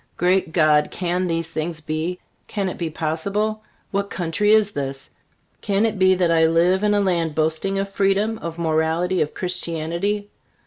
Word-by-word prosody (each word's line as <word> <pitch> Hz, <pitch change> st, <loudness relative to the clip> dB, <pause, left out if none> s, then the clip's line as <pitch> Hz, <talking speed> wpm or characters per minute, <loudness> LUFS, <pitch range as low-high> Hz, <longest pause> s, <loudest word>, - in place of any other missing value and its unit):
Great 180 Hz, -1 st, +2 dB
God! 155 Hz, -2 st, +3 dB
can 180 Hz, 0 st, -1 dB
these 165 Hz, -1 st, -2 dB
things 160 Hz, +1 st, -3 dB
be? 155 Hz, +3 st, -3 dB, 0.3 s
Can 200 Hz, -3 st, -2 dB
it -, -, -7 dB
be 170 Hz, -2 st, -2 dB
possible? 200 Hz, +8 st, -2 dB, 0.3 s
What 200 Hz, 0 st, -1 dB
country 185 Hz, +4 st, 0 dB
is 215 Hz, -1 st, +4 dB
this? 135 Hz, -4 st, -5 dB, 0.5 s
Can 200 Hz, +2 st, +1 dB
it 220 Hz, -3 st, -1 dB
be 185 Hz, 0 st, +5 dB
that 180 Hz, -2 st, +2 dB
I 160 Hz, -1 st, +4 dB
live 175 Hz, +4 st, +3 dB
in 210 Hz, 0 st, +3 dB
a -, -, +3 dB
land 170 Hz, -5 st, 0 dB
boasting 160 Hz, +5 st, 0 dB
of 195 Hz, 0 st, -1 dB
freedom, 200 Hz, +3 st, +1 dB
of 170 Hz, -4 st, -6 dB
morality, 165 Hz, +2 st, +1 dB
of 150 Hz, -, -2 dB
Christianity? 180 Hz, +3 st, -2 dB
175 Hz, 170 wpm, -22 LUFS, 160-195 Hz, 0.5 s, be